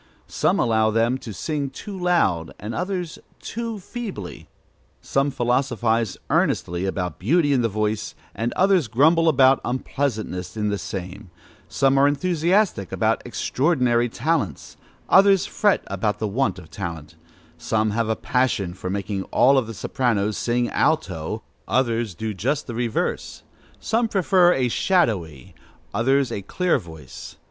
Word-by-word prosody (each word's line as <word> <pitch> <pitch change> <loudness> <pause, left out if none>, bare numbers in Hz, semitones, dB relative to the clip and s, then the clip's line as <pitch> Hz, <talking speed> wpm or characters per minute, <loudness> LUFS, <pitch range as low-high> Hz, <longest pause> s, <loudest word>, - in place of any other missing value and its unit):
Some - - 0
allow 110 -1 +3
them 115 +4 +1
to 115 - -8
sing 140 - -3
too 200 +9 -8
loud, 165 - +1
others 180 - -4 0.2
too 230 -1 -5
feebly; 200 - -7 0.5
some 135 +1 0
philosophize 120 -4 0
earnestly 90 +2 +1
about 90 -3 -3
beauty 145 - +2
in 130 - +2
the 115 - +1
voice, 110 +1 -2 0.2
and 115 +1 -2
others 190 - +3
grumble 160 +8 +4
about 135 -2 +5
unpleasantness 110 -8 -3
in 105 -1 0
the 100 -1 -2
same; 95 -1 -7 0.4
some 135 0 +2
are 140 - +5
enthusiastic 170 - +1
about - - +1
extraordinary 125 -5 +1
talents, 130 - -2 0.3
others 195 -1 +5
fret 205 -2 +1
about 100 +2 -2
the 110 - -2
want 125 +2 0
of 80 -4 -13
talent; 80 -1 -6 0.5
some 110 -1 0
have 115 +1 -1
a 110 - +1
passion 120 -10 0
for 90 0 -6
making 100 0 -3
all 135 +1 +4
the 115 -2 -7
sopranos 110 -1 -1
sing 120 0 0
alto, 110 - -1 0.2
others 115 -6 0
do 110 +4 -4
just 135 +10 -1
the 120 - -6
reverse; 115 -1 -2 0.4
some 230 +1 0
prefer 185 -3 +4
a 130 -6 +1
shadowy, 105 - 0 0.4
others 135 +5 +2
a 100 - -3
clear 180 - 0
voice. 80 - -11
120 Hz, 135 wpm, -23 LUFS, 105-150 Hz, 0.5 s, about